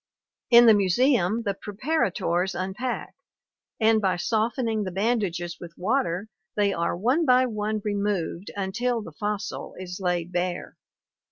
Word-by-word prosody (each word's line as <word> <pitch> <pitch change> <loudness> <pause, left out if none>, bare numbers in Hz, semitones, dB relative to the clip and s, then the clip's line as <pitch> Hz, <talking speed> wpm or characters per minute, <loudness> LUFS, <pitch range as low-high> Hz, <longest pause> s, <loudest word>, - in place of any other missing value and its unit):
In 240 0 +8
the 225 - +8
museum 210 +1 +2
the 200 -2 0
preparators 195 - -1
unpack, 195 +7 -3 0.7
and 220 -1 +4
by 190 -2 +2
softening 220 +2 0
the 190 - -3
bandages 185 -4 -1
with 170 -1 -10
water 200 -2 0 0.3
they 205 -1 +2
are 170 0 -1
one 250 - +2
by 255 -3 +5
one 215 -2 -2
removed 200 -3 -2
until 225 +4 -1
the 165 - -9
fossil 205 +6 -4
is 180 0 -7
laid 175 -2 -1
bare. 180 0 -2
205 Hz, 135 wpm, -25 LUFS, 180-230 Hz, 0.7 s, In